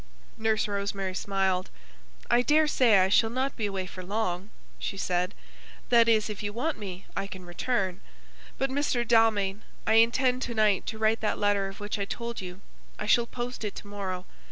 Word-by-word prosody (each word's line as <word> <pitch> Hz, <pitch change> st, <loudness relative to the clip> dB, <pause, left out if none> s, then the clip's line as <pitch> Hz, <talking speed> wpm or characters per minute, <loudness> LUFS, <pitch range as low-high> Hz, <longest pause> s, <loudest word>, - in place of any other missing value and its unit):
Nurse 220 Hz, -1 st, +1 dB
Rosemary 200 Hz, -2 st, -2 dB
smiled. 190 Hz, -1 st, 0 dB, 0.6 s
"I 240 Hz, -, +4 dB
daresay 285 Hz, -6 st, +4 dB
I 185 Hz, 0 st, +4 dB
shall 225 Hz, +3 st, +4 dB
not 260 Hz, +3 st, -1 dB
be 215 Hz, -, -1 dB
away 195 Hz, -2 st, -3 dB
for 185 Hz, 0 st, -8 dB
long," 190 Hz, -1 st, -2 dB, 0.3 s
she 195 Hz, -, -3 dB
said. 180 Hz, +1 st, -1 dB, 0.5 s
"That 235 Hz, -1 st, +6 dB
is, 215 Hz, -2 st, +3 dB
if 210 Hz, -2 st, -5 dB
you 205 Hz, -1 st, -3 dB
want 270 Hz, +5 st, -2 dB
me, 190 Hz, -3 st, -7 dB
I 195 Hz, -, -2 dB
can 185 Hz, -2 st, -9 dB
return. 185 Hz, +1 st, -1 dB, 0.6 s
But, 270 Hz, 0 st, 0 dB
Mr. 265 Hz, -4 st, 0 dB
Dalmain, 220 Hz, -3 st, +3 dB, 0.2 s
I -, -, +3 dB
intend 250 Hz, +3 st, +4 dB
to 235 Hz, -, -3 dB
night 215 Hz, -3 st, +2 dB
to 225 Hz, -, -3 dB
write 220 Hz, +1 st, +2 dB
that 215 Hz, -, 0 dB
letter 205 Hz, -1 st, +2 dB
of 195 Hz, -, -9 dB
which 205 Hz, +1 st, -3 dB
I 200 Hz, -, 0 dB
told 235 Hz, +2 st, -5 dB
you. 180 Hz, +1 st, -8 dB, 0.4 s
I -, -, -4 dB
shall 235 Hz, +3 st, +4 dB
post 245 Hz, 0 st, -5 dB
it 210 Hz, -, -3 dB
to -, -, -8 dB
morrow. 190 Hz, -3 st, -4 dB
210 Hz, 185 wpm, -28 LUFS, 195-235 Hz, 0.6 s, That